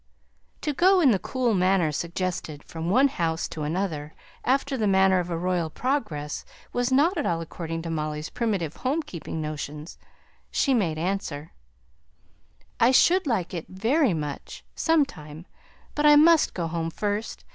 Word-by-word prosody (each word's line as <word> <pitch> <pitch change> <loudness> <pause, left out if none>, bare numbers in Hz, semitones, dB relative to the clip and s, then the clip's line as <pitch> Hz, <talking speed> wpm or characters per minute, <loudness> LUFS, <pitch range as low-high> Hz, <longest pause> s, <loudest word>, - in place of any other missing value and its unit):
To 300 - -1
go 370 +6 +4
in 290 -7 +5
the 195 - +2
cool 250 0 -1
manner 185 -4 +2
suggested 170 -2 -4
from 165 +1 -5
one 260 +8 +5
house 165 -9 -2
to 155 - -6
another, 155 -1 -3 0.3
after 270 +2 +1
the 220 -5 0
manner 190 -1 +4
of 180 0 -3
a 170 - -2
royal 175 -1 -1
progress, 165 - -2 0.3
was 245 +1 0
not 315 +7 +3
at 290 - -1
all 170 -1 0
according 165 0 -5
to 165 - -4
Molly's 155 -1 -3
primitive 195 -10 -2
home 285 +6 -1
keeping 170 - -6
notions. 150 0 -6 0.5
She 275 - +1
made 175 -10 +1
answer, 165 -3 -3 1.3
"I 235 - +5
should 345 +6 +4
like 195 -9 -1
it 170 -3 -5
very 225 - +1
much, 150 -2 -6
some 325 -3 +3
time. 155 - -11 0.5
But 300 0 +2
I 295 - +8
must 320 +2 +5
go 175 - -2
home 165 0 -2
first. 205 +5 -3
185 Hz, 160 wpm, -25 LUFS, 160-260 Hz, 1.3 s, I